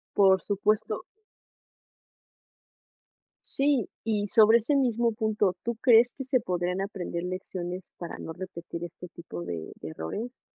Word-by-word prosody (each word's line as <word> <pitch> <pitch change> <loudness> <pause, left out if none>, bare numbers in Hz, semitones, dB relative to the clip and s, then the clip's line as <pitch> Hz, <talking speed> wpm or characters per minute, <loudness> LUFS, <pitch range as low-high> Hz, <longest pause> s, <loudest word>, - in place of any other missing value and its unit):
Por 190 -1 +5
supuesto. 210 +1 0 2.4
Sí. 275 -5 +2 0.2
Y 210 -2 0
sobre 220 +2 +7
ese 235 +6 0
mismo 235 -3 +2
punto, 215 -4 +1
¿tú 235 0 -1
crees 240 -1 +6
que 270 - -5
se 255 -1 +2
podrían 180 -1 -1
aprender 190 -3 -3
lecciones 185 0 -5
para 170 - -6
no 160 - -6
repetir 170 -1 -7
este 175 +1 -9
tipo 165 - -8
de 85 -2 -5
de - - -6
errores? 210 - -6
200 Hz, 130 wpm, -28 LUFS, 175-230 Hz, 2.4 s, sobre